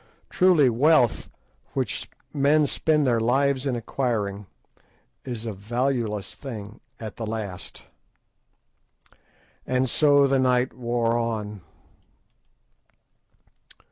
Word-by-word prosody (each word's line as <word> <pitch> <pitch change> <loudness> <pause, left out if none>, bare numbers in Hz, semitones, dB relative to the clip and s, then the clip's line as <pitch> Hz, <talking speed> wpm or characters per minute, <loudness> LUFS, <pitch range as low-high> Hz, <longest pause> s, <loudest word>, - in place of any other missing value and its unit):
Truly 180 -7 +5
wealth, 125 0 +3 0.5
which - - -2 0.2
men 145 +2 +3
spend 150 +1 +1
their 120 -3 +2
lives 135 +3 +1
in 130 - 0
acquiring, 110 -5 -2 0.8
is 120 -3 -6
a 110 - -3
valueless 115 0 -2
thing 110 -5 -8 0.2
at 110 -2 -7
the 115 - -4
last. 105 -4 -6 1.8
And 130 +1 +1
so 145 +2 +4
the 135 -1 +2
night 125 -1 +2
wore 120 -1 0
on. 105 -3 -3
120 Hz, 95 wpm, -25 LUFS, 110-135 Hz, 1.8 s, Truly